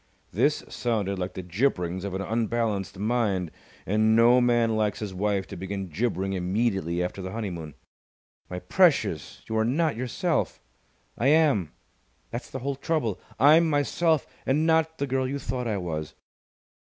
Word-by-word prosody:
This - - +1
sounded 100 -5 -1
like 90 0 -4
the 95 - -5
gibberings 90 -2 0
of 95 -2 -4
an 95 - -2
unbalanced 110 -4 -1
mind, 100 -5 0 0.3
and 110 +2 +3
no 120 +2 +6
man 120 -2 +3
likes 105 -2 0
his 105 -3 -5
wife 100 0 0
to 100 - -9
begin 95 +1 -5
gibbering 95 +1 -1
immediately 95 -2 0
after 90 +2 -4
the 95 0 -5
honeymoon. 90 -9 -5 0.7
"My 90 - -4
precious! 110 - +1
You 110 - -3
are - - +3
not 150 +5 +1
yourself!" 150 - -1 0.6
"I 120 - +2
am! 140 - +3 0.6
That's 120 +2 -5
the - - -5
whole 140 -1 -1
trouble! 140 - -1 0.2
I'm 155 +5 +6
myself 155 +1 +2 0.2
and 150 +4 +1
not 160 0 +2
the 140 - -1
girl 130 -1 0
you 140 +2 -2
thought 125 -2 -3
I 105 -3 0
was!" 80 -4 -4
110 Hz, 155 wpm, -26 LUFS, 95-130 Hz, 0.7 s, no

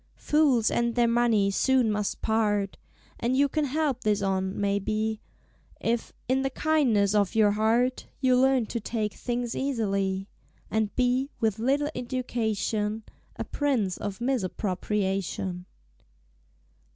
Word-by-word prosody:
"Fools 285 -7 +3
and 235 0 0
Their 240 -1 +3
Money 230 -4 +3
soon 255 +1 +2
must 210 -1 -2
part!" 210 -3 +1 0.4
And 250 +2 0
you 285 +1 +4
can 305 +2 0
help 285 -2 -1
this 210 -1 +1
on, 190 0 -1
may 200 0 +1
be, 215 +2 -2 0.6
If, 230 0 -1 0.2
in 260 +2 +2
the 270 - 0
kindness 255 -10 +2
of 205 -1 +1
your 215 -2 +5
Heart, 230 +4 +1
You 255 -2 +3
Learn 260 -1 +3
to 235 - -4
Take 215 -1 -2
things 240 -1 -3
easily; 195 -7 -1 0.4
And 220 -1 0
be, 255 +2 +1
with 220 -2 0
little 280 +5 +1
education, 220 -3 -2 0.3
A - - -3
Prince 245 -11 0
of 200 -2 -5
Misappropriation. 195 -5 -2
225 Hz, 130 wpm, -27 LUFS, 205-255 Hz, 0.6 s, your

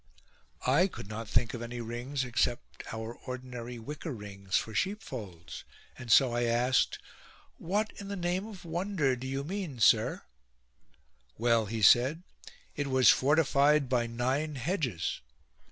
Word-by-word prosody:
I 145 +9 +4
could 175 - -9
not 110 +2 -6
think 120 +3 +1
of 120 - -5
any 120 +1 -5
rings 120 +4 -3
except 120 -1 -2
our 110 +1 -5
ordinary 125 -1 -7
wicker 150 +7 -6
rings 100 -4 -3
for 110 - -3
sheepfolds; 105 - -4 0.3
and 120 -2 -6
so 125 +1 +6
I 120 0 +1
asked: 120 +2 +2 0.3
" - - -22 0.3
What, 205 +6 -1
in 200 - -7
the 200 - -4
name 180 +2 -1
of 195 -5 -11
wonder, 170 -5 0
do 130 +1 -7
you 135 +1 -2
mean, 175 -4 -4
sire? - - +4 0.4
" 60 +2 -39
" 60 -2 -39
Well," 115 -1 +2
he 110 0 -3
said, 130 - +5 0.3
" - - -26
it 145 -1 -2
was 130 -1 +6
fortified 145 -1 +3
by 120 -2 +1
nine 130 +6 -1
hedges." 130 - -2
125 Hz, 155 wpm, -30 LUFS, 115-150 Hz, 0.4 s, so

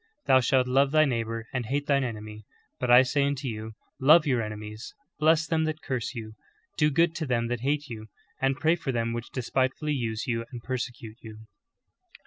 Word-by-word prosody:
Thou 130 - +6
shalt 130 0 +2
love 135 +2 +3
thy 155 +1 +4
neighbor 115 -3 -2
and 125 -3 -2
hate 145 +3 -1
thine 140 -1 +2
enemy. 110 -3 -6 0.4
But 125 - -2
I 125 +1 +8
say 140 +2 +1
unto 140 -1 -1
you, 110 -1 -5 0.3
Love 150 +4 +6
your 125 -5 +1
enemies, 110 +1 -7 0.2
bless 160 +1 +4
them 160 -1 0
that 155 0 -4
curse 130 -1 -3
you, 110 -2 -7 0.4
do 150 -1 +3
good 165 +3 +2
to 155 - -3
them 120 -2 0
that 120 -1 -2
hate 145 +2 -1
you, 110 -3 -8 0.3
and 135 0 +2
pray 160 +2 +3
for 155 -5 -3
them 115 -1 -1
which 120 0 -5
despitefully 130 +4 -1
use 115 -4 -2
you 115 -2 -1
and 120 -2 -8
persecute 120 -3 -5
you."' 110 -1 -11
125 Hz, 195 wpm, -27 LUFS, 115-145 Hz, 0.4 s, I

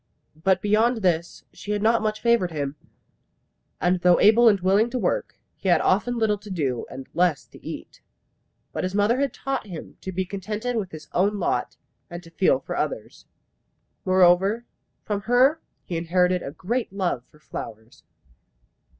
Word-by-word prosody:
But 190 -1 +2
beyond 220 +2 +2
this 170 -2 0
she 210 - -5
had 205 0 -2
not 230 +1 +3
much 215 0 -2
favoured 235 -6 +3
him; 145 -3 -4 1.0
and 180 +1 +2
though 175 0 +4
able 225 +3 +6
and 200 -2 +2
willing 195 +5 +3
to 255 - -3
work, - - -1 0.2
he 190 - -3
had 175 - +5
often 235 +6 +1
little 215 -2 +1
to 205 +1 -12
do, 140 -10 -2
and 130 0 -9
less 175 -4 +1
to - - -16
eat. - - -8 0.7
But - - -3
his 185 +1 -2
mother 210 +5 +2
had 280 -1 +1
taught 270 -5 -4
him 170 -5 -9
to 190 - -5
be 190 +1 -2
contented 210 +6 -4
with 205 -5 -2
his 155 -2 -10
own 200 +3 +2
lot, - - -1 0.3
and 175 0 -8
to 165 - -15
feel 185 +2 +2
for - - -5
others. - - -4 0.8
Moreover, 190 +4 +4 0.4
from 205 -1 -2
her 255 +8 +3 0.2
he 170 - -3
inherited 180 +2 +1
a - - -5
great 225 - -3
love 185 -10 -2
for - - -22
flowers. 115 -6 -9
190 Hz, 170 wpm, -24 LUFS, 175-220 Hz, 1.0 s, able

